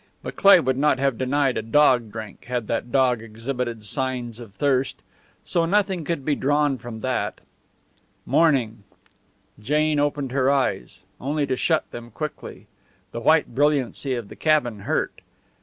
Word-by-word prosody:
But - - -6
Cleigh 200 -2 +7
would 130 0 0
not 150 -1 +3
have 135 -3 0
denied 135 0 +1
a - - -2
dog 120 -1 +3
drink 110 -2 -9
had 125 -2 -3
the 115 +1 -1
dog 125 -1 +1
exhibited 115 0 -5
signs 125 0 -3
of 110 -5 -12
thirst. 135 +1 0 0.4
So 170 - 0
nothing 190 -3 +1
could 165 -5 -3
be 150 - +2
drawn 145 -1 +1
from 115 -1 -8
that. 130 -1 -2 0.9
Morning. 125 -9 +2 0.8
Jane 150 +6 +1
opened 145 -2 -1
her 135 0 +2
eyes, 135 - -1 0.2
only 145 +2 -1
to 130 - -1
shut 160 +4 0
them 120 0 -8
quickly. 150 +6 -7 0.5
The 115 - -5
white 155 +1 +3
brilliancy 140 -1 +1
of 115 -4 -6
the - - -10
cabin 150 -9 +1
hurt. 100 - -2
130 Hz, 155 wpm, -23 LUFS, 120-145 Hz, 0.9 s, Cleigh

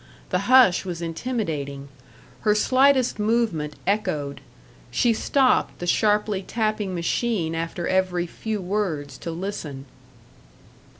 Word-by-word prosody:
The 195 +4 -1
hush 255 -8 +6
was 175 -3 -5
intimidating; 165 - -3 0.5
her 210 -1 +2
slightest 255 +1 +3
movement 210 -9 0
echoed; 155 -9 -1 0.5
she 240 -2 +2
stopped 260 +3 +2
the 175 - -5
sharply 210 +1 +2
tapping 215 -2 -2
machine 170 0 -1
after 165 +1 -3
every 185 -2 +1
few 215 +4 -4
words 175 -8 -2
to - - -6
listen. 165 -6 -5
190 Hz, 110 wpm, -24 LUFS, 165-220 Hz, 0.5 s, hush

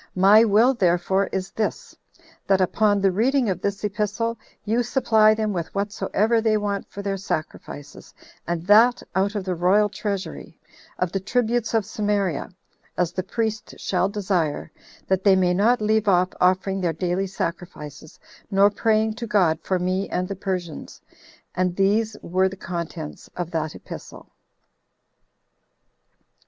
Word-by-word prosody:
My 200 +4 +7
will 230 +4 +4
therefore 190 -2 +1
is 190 0 -4
this, 220 - -3 0.5
That 195 -1 +3
upon 205 +2 +2
the 195 -1 +3
reading 240 +3 +2
of 180 -1 -4
this 200 0 -2
epistle, 210 +2 -1 0.3
you 225 +3 +1
supply 220 -3 +3
them 215 -1 -1
with 170 0 -4
whatsoever 210 +2 0
they 220 -1 +2
want 205 -1 -3
for 200 - -8
their 195 -1 -2
sacrifices, 155 -5 -6 0.4
and 170 -1 -2
that 225 +5 +5
out 200 +2 0
of 205 - -2
the 185 -1 -2
royal 190 +5 +3
treasury, 200 -1 -5 0.4
of 180 -2 -1
the 195 - -1
tributes 235 +3 0
of 220 -3 +2
Samaria, 205 -6 -1 0.5
as 175 -2 +1
the 185 - -2
priest 220 +3 -3
shall 185 0 0
desire, 185 -7 -1 0.4
that 190 0 +1
they 195 -2 +6
may 180 -1 +2
not 215 +6 +3
leave 215 0 +1
off 180 -1 +4
offering 190 +1 +2
their 170 -2 0
daily 180 +3 -1
sacrifices, 165 -5 -6 0.3
nor 200 0 +4
praying 220 +1 +1
to 235 - -5
God 175 -7 +2
for 185 +4 0
me 185 +2 -1
and 180 +1 -2
the 195 - -4
Persians." 180 -5 -5 0.5
And 180 -1 0
these 210 +3 +1
were 185 +2 +1
the 195 - -10
contents 170 -4 -6
of 175 -1 -4
that 155 -2 -2
epistle. - - -10
195 Hz, 150 wpm, -23 LUFS, 180-215 Hz, 0.5 s, My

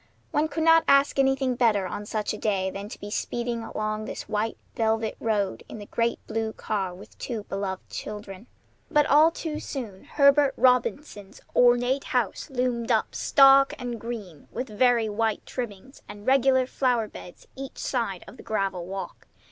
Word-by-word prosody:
One 300 +1 +2
could 315 +1 -2
not 325 0 +6
ask 275 0 +4
anything 270 -1 +2
better 220 -5 +2
on 205 +3 -5
such 215 -1 -2
a - - -5
day 190 -3 0
than 200 +2 -7
to - - -9
be 205 - -8
speeding 235 +1 -2
along 215 -1 -3
this - - -6
white 215 +1 -1 0.2
velvet 225 -1 0
road 205 -4 -1
in - - -7
the 205 - -8
great 230 +2 0
blue 220 0 -2
car 195 -5 -2
with 185 - -14
two 230 -4 -4
beloved 195 -2 -4
children. 205 +1 -7 0.4
But 300 -2 +4
all 300 +3 +6
too 320 -2 -5
soon 220 -9 -7
Herbert 280 -1 +4
Robinson's 250 -4 +1 0.2
ornate 245 +2 +4
house 245 - -1
loomed 250 -3 -1
up, - - +1
stark 275 0 +5
and 245 -4 -5
green, 210 -10 -7
with 255 +2 -4
very 235 +1 +3
white 215 0 -1
trimmings, 245 +1 -7
and 205 0 -10
regular 260 -1 +4
flower 250 -4 0
beds 180 - -12
each 270 0 -8
side 230 -8 -2
of - - -12
the - - -11
gravel 195 -5 -2
walk. 195 +1 -7
230 Hz, 170 wpm, -26 LUFS, 205-265 Hz, 0.4 s, not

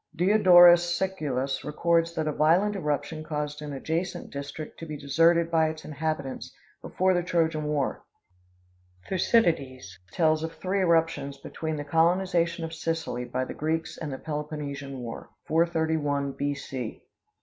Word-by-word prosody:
Diodorus 175 -2 +6
Siculus 145 -9 -2
records 165 +2 +1
that 155 -1 -1
a - - +1
violent 175 +8 +3
eruption 155 -2 -2
caused 150 -1 -4
an 150 -1 -6
adjacent 160 +6 -3
district 140 +2 -7
to 165 - -7
be 155 -1 -5
deserted 165 +4 +3
by 160 -1 +3
its 155 0 -8
inhabitants 155 -3 -4 0.3
before 185 +1 +1
the 175 - +1
Trojan 165 -3 0
war. 150 -3 -1 1.1
Thucydides 140 - +1
tells 155 -2 +2
of 165 0 -4
three 190 +2 -2
eruptions 165 -6 +1
between 160 +3 -5
the 145 - -4
colonization 170 +2 +1
of 165 - -7
Sicily 160 -6 -3
by 130 +1 -2
the - - -6
Greeks 160 +2 -2
and 155 -3 -6
the 135 - -4
Peloponnesian 150 -2 -5
war 115 -1 -7 0.2
431 160 -4 0
B. 145 +1 -2
C. 130 -5 -6
160 Hz, 140 wpm, -27 LUFS, 145-170 Hz, 1.1 s, Diodorus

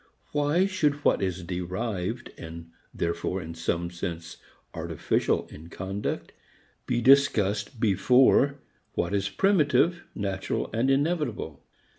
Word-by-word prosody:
Why 150 +5 +2
should 185 -7 +1
what - - +4
is 95 -2 -2
derived 95 +5 -3
and 85 0 -9 0.2
therefore 85 +2 -2
in 80 -2 -7
some 85 +1 -2
sense 85 -2 -5 0.4
artificial - - 0
in 80 +2 -11
conduct 95 +4 -4 0.6
be 120 -1 +1
discussed 110 -5 +3
before 125 +7 +4 0.4
what 85 +3 -1
is 100 0 0
primitive, 170 -2 +3
natural 95 -2 -2
and 115 +4 +1
inevitable? 135 - 0
100 Hz, 110 wpm, -27 LUFS, 85-140 Hz, 0.6 s, what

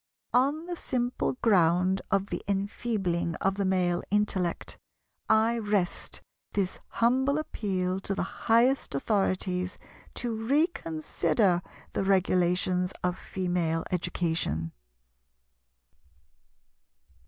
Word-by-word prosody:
On 280 +6 +2
the 350 0 -4
simple 250 -6 -1
ground 185 -2 +4
of 195 0 0
the - - -2
enfeebling 195 -4 -1
of 195 +4 +1
the 200 0 -1
male 180 -2 +1
intellect, 195 -4 0 0.5
I 225 +2 +4
rest 205 -5 -1 0.3
this 195 -2 -1
humble 265 +5 +2
appeal 190 -10 -2
to 195 0 -2
the - - -1 0.3
highest 235 - +4
Authorities 185 +1 0 0.4
to 240 -1 -1
reconsider 220 - +1 0.3
the - - 0
regulations 180 -1 +2
of 180 0 +1
Female 175 -4 -1
education. 165 - -1
190 Hz, 95 wpm, -28 LUFS, 180-225 Hz, 0.5 s, ground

